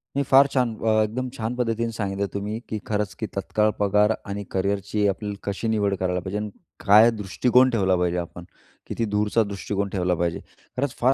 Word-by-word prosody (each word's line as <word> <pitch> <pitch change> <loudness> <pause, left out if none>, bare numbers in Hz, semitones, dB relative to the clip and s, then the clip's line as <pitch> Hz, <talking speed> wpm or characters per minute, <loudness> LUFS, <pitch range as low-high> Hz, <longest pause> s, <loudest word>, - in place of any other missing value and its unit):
नाही 140 - +1
फार 135 +1 +7
छान. 125 -4 +1
अ, 110 -1 +2
एकदम 125 +4 -3
छान 115 +2 -3
पद्धतीने 115 -1 -1
सांगितलं 100 -1 -2
तुम्ही, 105 +3 -3
की 110 - -3
खरंच 105 -2 -1
की - - -2
तत्काळ 110 0 +1
पगार 105 +1 +3 0.2
आणि 100 +1 -4
करिअरची 100 +2 0
आपल्याला 100 +1 -2
कशी 100 +3 -3
निवड 105 -3 +1
करायला 90 -1 0
पाहिजे 95 +3 -4
आणि 105 0 -3 0.4
काय 105 +3 +7
दृष्टिकोन 125 +5 +2
ठेवला 95 -6 +2
पाहिजे 90 0 0
आपण. 85 0 -6 0.4
किती 115 - -2
दूरचा 105 +2 +1
दृष्टिकोन 100 0 -3
ठेवला 90 -2 0
पाहिजे. 85 0 -1 0.4
खरंच 135 0 -1
फार 130 +2 +4
105 Hz, 185 wpm, -24 LUFS, 100-115 Hz, 0.4 s, फार